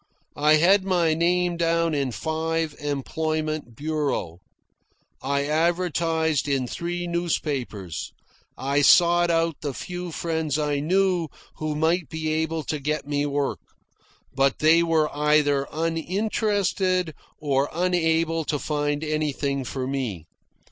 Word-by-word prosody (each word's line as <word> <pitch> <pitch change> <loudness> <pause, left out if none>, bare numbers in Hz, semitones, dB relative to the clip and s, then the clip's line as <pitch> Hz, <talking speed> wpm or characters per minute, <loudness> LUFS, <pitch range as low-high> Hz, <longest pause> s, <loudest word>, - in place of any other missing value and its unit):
I 150 +1 +5
had 185 +5 +5
my 175 -4 +2
name 175 +1 +1
down 165 -1 +1
in 140 -3 0
five 160 +2 -2
employment 155 -1 -2
bureaux. 145 - -2 0.8
I 140 +1 0
advertised 160 -1 +1
in 135 -2 0
three 175 +6 -4
newspapers. 145 - -3 0.5
I 140 +2 +1
sought 175 +3 +5
out 165 -2 +1
the 145 -4 -4
few 180 -1 -5
friends 160 -3 -1
I 150 -2 0
knew 180 +2 +1 0.3
who 155 -1 -2
might 160 0 +1
be 160 -1 -3
able 160 0 -1
to 150 +2 -3
get 150 +1 -2
me 145 0 0
work; 145 -1 -1 0.7
but 135 0 +2
they 160 +2 +5
were 160 -3 +1
either 145 -2 +2
uninterested 185 +2 0 0.2
or 140 -1 0
unable 165 -2 +1
to 150 - -1
find 145 0 -1
anything 145 -3 -1
for 130 +1 -4
me. 125 - -3
155 Hz, 120 wpm, -24 LUFS, 145-170 Hz, 0.8 s, I